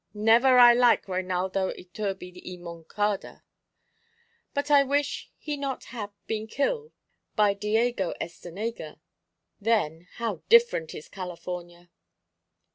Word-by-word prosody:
Never 230 +5 +5
I 240 -1 +9
like 240 -3 +4
Reinaldo 185 0 -1
Iturbi 185 -1 -6
y 180 0 -7
Moncada; 175 +4 -3 1.1
but 285 0 -2
I 285 -1 +8
wish 285 +1 -1
he 300 -1 -4
not 275 -2 -4
have 220 -4 -6 0.2
been 220 0 -3
kill 455 - -1 0.4
by 210 -2 +4
Diego 210 -1 0
Estenega. 175 -1 -6 0.6
Then, 180 -7 0
how 225 -7 -3
different 465 - +4
is 150 - -9
California!" 175 -1 -7
210 Hz, 110 wpm, -27 LUFS, 180-245 Hz, 1.1 s, I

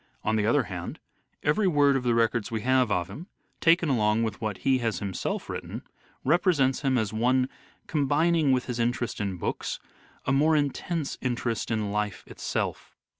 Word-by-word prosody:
On 110 - +1
the 105 -1 +1
other 135 +4 +3
hand, 90 -4 -6 0.4
every 190 +8 +2
word 145 -5 +4
of 135 - +1
the 120 -2 +1
records 115 -1 +1
we 110 -2 -2
have 130 0 +3
of 90 -2 +1
him, 145 - -9 0.3
taken 165 0 +4
along 110 -4 +2
with 110 -2 -3
what 105 -3 -2
he 130 -1 +4
has 115 -6 -1
himself 95 0 -3
written, - - -6 0.4
represents 145 -4 +3
him 135 -3 +2
as 110 -2 -1
one 125 +3 +2 0.4
combining 150 +1 +2
with 130 -1 +2
his 125 -2 -4
interest 120 -1 -1
in 100 -3 -2
books - - -3 0.5
a - - +1
more 150 +4 +4
intense 150 +2 -1
interest 120 -2 -2
in 110 -3 -1
life 105 -1 -2
itself. - - -4
125 Hz, 175 wpm, -27 LUFS, 110-145 Hz, 0.5 s, word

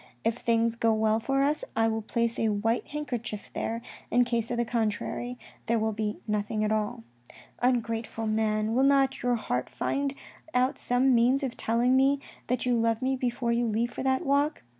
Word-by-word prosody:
If 230 +1 0
things 230 -1 +1
go 230 -1 +2
well 220 0 +2
for 270 +4 +1
us, 295 +2 +1
I 225 0 +3
will 225 0 -1
place 230 +2 -1
a 225 - +2
white 220 +3 0
handkerchief 245 -8 -5
there, 230 +1 -3 0.3
in 245 +1 +4
case 235 -2 -1
of 240 - -2
the 240 - +1
contrary, 235 +2 -2 0.3
there 230 0 +2
will 220 0 0
be 215 0 -2
nothing 210 0 -1
at 215 - 0
all. 210 - -1 0.3
" - - -21
Ungrateful 230 -2 0
man, 215 0 +1
will 255 - +3
not 270 -1 +3
your 245 0 +2
heart 125 - -2
find 280 0 -1 0.4
out 255 +1 +2
some 255 +2 +2
means 250 +4 +3
of 260 -3 -2
telling 240 +3 +2
me 275 +1 +4 0.3
that 250 +1 -1
you 250 -1 +2
love 230 +1 +1
me 265 +1 +1
before 245 -2 -1
you 235 0 +1
leave 230 +2 0
for - - -5
that 265 0 +1
walk. 285 +2 +1
235 Hz, 195 wpm, -28 LUFS, 220-255 Hz, 0.4 s, in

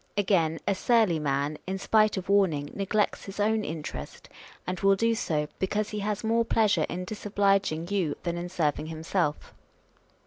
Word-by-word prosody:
Again, 175 -5 +2
a 200 - +3
surly 210 -4 +2
man, 145 +1 -1
in 190 +1 -2
spite 215 +1 +3
of 190 - -4
wrarning, 180 -8 +2
neglects 205 +1 0
his 195 +1 -8
own 215 +1 +2
interest, 155 -2 -7 0.4
and 180 -1 -3
will 195 0 +4
do 230 +3 +2
so, 155 -9 -1
because 210 +2 -1
he 210 - -3
has 210 +1 -2
more 230 +1 +2
pleasure 220 -2 +2
in 180 +1 -4
dis 210 +3 -7
obliging 195 -5 +1
you 190 -7 0
than 170 -1 -2
in 175 +1 -4
serving 155 -4 -1
himself. 160 0 -2
190 Hz, 170 wpm, -27 LUFS, 160-210 Hz, 0.4 s, will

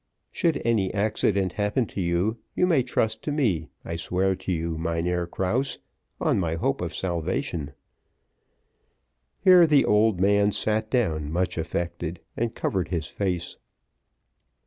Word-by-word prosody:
"Should 165 -2 0
any 110 -5 +2
accident 100 -3 +1
happen 105 +4 0
to 100 - -5
you, 90 +6 0 0.2
you 180 - +3
may 165 -7 +3
trust 110 -3 -1
to 150 - -3
me, 110 - 0 0.2
I 85 - -4
swear 90 +4 0
it 95 - -3
to - - -4
you, 85 -1 -1
Mynheer 85 +2 -1
Krause, 105 +11 -1 0.4
on - - +2
my 80 -3 -1
hope 85 - -1
of - - -4
salvation." 85 -4 -2 1.7
Here 180 -3 +7
the 150 -3 +5
old 105 -2 +3
man 100 +1 +3
sat 110 0 0
down 80 - 0
much 90 +2 0
affected, 85 +1 -3 0.2
and 115 0 -2
covered 95 -4 -1
his 85 -4 -2
face. 90 0 -3
95 Hz, 145 wpm, -25 LUFS, 85-110 Hz, 1.7 s, Here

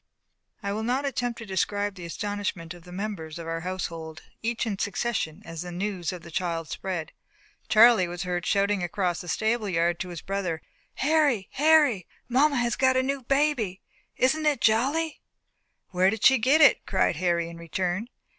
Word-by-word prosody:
I 200 0 -1
will 215 - -2
not 250 +5 0
attempt 245 -3 -2
to 230 - -8
describe 205 +1 -1
the 180 -3 -8
astonishment 195 -2 -4
of 175 -1 -15
the 180 - -12
members 180 -5 -5
of 170 - -7
our 165 0 -3
household, 165 -3 -5 0.2
each 230 +1 -1
in 200 -4 -3
succession, 205 -5 -2
as 165 -1 -6
the 180 0 -6
news 180 -1 -3
of 180 -2 -8
the 170 - -11
child 165 -3 -2
spread. 180 -4 -4 0.6
Charlie 220 -4 +6
was 175 +1 -5
heard 180 -1 -2
shouting 200 0 +1
across 175 0 -1
the 175 - -10
stable 220 +4 0
yard 170 -1 +1
to 180 - -4
his 175 -3 -7
brother: 190 -5 -3 0.3
"Harry, 285 -8 +2
Harry! 290 - +4 0.2
Mamma 280 +4 +3
has 240 -2 +1
got 260 -1 +3
a 260 - +3
new 275 +1 -2
baby. 260 -8 0 0.3
Isn't 305 +4 +2
it 295 -2 +2
jolly?" 275 +9 +1 0.7
"Where 185 0 +3
did 220 0 -3
she 265 -1 +7
get 270 +7 +4
it?" 285 - +6
cried 190 -4 +1
Harry 170 -1 +1
in 170 0 -9
return. 180 +6 -2
200 Hz, 180 wpm, -26 LUFS, 175-240 Hz, 0.7 s, she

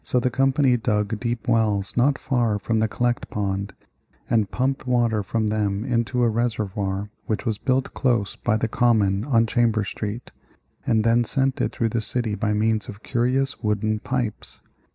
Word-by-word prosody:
So 125 - +1
the 125 +1 0
company 135 0 +3
dug 105 -2 -1
deep 120 0 -3
wells 105 -4 +1
not 135 +3 +3
far 120 -7 0
from 110 +2 -1
the 110 - +2
Collect 120 +2 -1
Pond, 100 -1 -2 0.6
and 110 -4 +2
pumped 130 +1 -1
water 120 -3 +2
from 110 +2 -1
them 105 0 -1
into 125 0 0
a - - +4
reservoir 105 -3 -2 0.2
which 110 - -2
was 110 -3 -1
built 130 0 0
close 120 -7 0
by 110 -2 0
the 115 - 0
Common 105 -4 +2
on 115 -4 +3
Chambers 110 -3 +1
Street, 105 +3 -5 0.6
and 110 -1 +3
then 115 +1 +3
sent 135 +2 0
it - - 0
through 115 -2 -1
the 115 0 -1
city 110 0 -1
by 105 0 -1
means 110 +2 0
of 105 -1 -10
curious 130 +3 0
wooden 105 0 0
pipes. 120 -2 -4
115 Hz, 175 wpm, -23 LUFS, 105-120 Hz, 0.6 s, a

